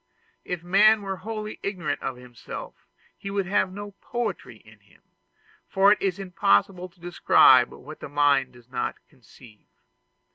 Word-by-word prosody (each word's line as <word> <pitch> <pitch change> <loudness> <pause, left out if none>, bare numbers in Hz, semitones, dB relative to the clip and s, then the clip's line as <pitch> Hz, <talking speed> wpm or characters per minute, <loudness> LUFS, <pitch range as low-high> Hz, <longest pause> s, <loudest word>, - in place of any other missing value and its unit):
If 180 -2 -5
man 205 +4 +4
were 195 -1 -4
wholly 215 +2 -6
ignorant 185 -6 -3
of 135 - -4
himself, 125 -1 -10 0.3
he 200 - -8
would 195 -1 -1
have 190 0 0
no 205 +1 -8
poetry 240 -2 -4
in - - -20
him; - - -26 0.7
for 195 +1 +4
it 210 - +2
is 190 -1 -1
impossible 180 - 0
to 180 0 -30
describe 135 -7 +5
what 150 +4 -12
the - - -8
mind 140 -3 +2
does 120 -1 -18
not 125 -1 -3
conceive. 120 -4 -19
180 Hz, 150 wpm, -25 LUFS, 130-200 Hz, 0.7 s, describe